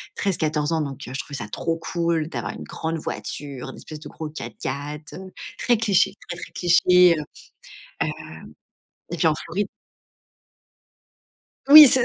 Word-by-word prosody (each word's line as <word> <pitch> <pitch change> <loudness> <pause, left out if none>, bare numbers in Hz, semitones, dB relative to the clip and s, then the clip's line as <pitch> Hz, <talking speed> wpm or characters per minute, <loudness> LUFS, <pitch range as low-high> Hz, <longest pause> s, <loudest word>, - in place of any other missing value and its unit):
13-14 155 -5 0
ans, 160 -1 +1
donc, 140 -1 -5
heu, - - -7
je 135 - -3
trouvais 140 -1 -5
ça 105 - -5
trop 165 +8 -2
cool 165 -2 -1
d'avoir 120 -8 -4
une - - -8
grande 160 - -4
voiture, 140 -3 -6
une - - -9
espèce 155 - -9
de 150 - -10
gros 155 -1 -6
4x4, 145 +3 -6
heu, 190 0 -10 0.3
très 240 -1 +3
cliché, 200 -3 +3 0.2
très, 175 - -4
très - - -8
cliché, 180 0 +5
heu - - -2 0.8
heu - - -1 1.0
et 170 - -3
puis 160 - +2
en 160 - +5
Floride 180 +6 -3 2.0
Oui, 300 +1 +13
c 260 0 +6
160 Hz, 160 wpm, -23 LUFS, 145-180 Hz, 2.0 s, Oui